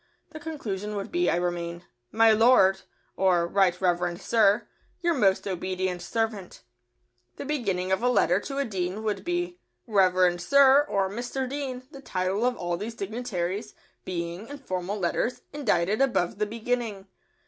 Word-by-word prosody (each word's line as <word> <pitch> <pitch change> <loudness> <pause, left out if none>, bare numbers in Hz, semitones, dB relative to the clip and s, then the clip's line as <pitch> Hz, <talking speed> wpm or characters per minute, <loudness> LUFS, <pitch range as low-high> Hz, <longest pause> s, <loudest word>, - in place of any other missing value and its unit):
The 310 - -8
conclusion 210 - -5
would 200 -1 -5
be, 350 +1 +2
I - - +2
remain, 175 0 -3 0.3
"My 225 0 +5
Lord" 215 -4 +5 0.3
(or 180 -3 +3
"Right 180 0 +2
Reverend 175 -1 0
Sir") 215 0 +3 0.3
"Your 340 -1 +2
most 200 -9 +2
obedient 185 -1 -2
servant." 215 -1 -2
[Sidenote: - - -11
A - - -14
dean.] 120 0 -36
The - - -6
beginning 200 -11 -1
of 190 - +1
a 245 - +2
letter 180 -7 +3
to 275 +6 -6
a 280 - +1
dean 190 -1 -3
would 215 -2 -2
be, 350 0 -2 0.3
"Reverend 185 -4 +3
Sir" 275 +7 +6
or 195 -1 +1
"Mr. 245 +6 -4
Dean," 265 -2 -4
the 275 - -11
title 190 +1 -1
of 250 - -1
all 175 0 -2
these 220 +5 -6
dignitaries 205 -2 -4 0.3
being, 175 +3 -4
in 285 - -8
formal 190 -6 -4
letters, 195 +6 -1
indited 215 -7 +1
above 210 -9 +1
the 210 - +1
beginning. 225 -2 -3
200 Hz, 165 wpm, -27 LUFS, 180-245 Hz, 0.3 s, Sir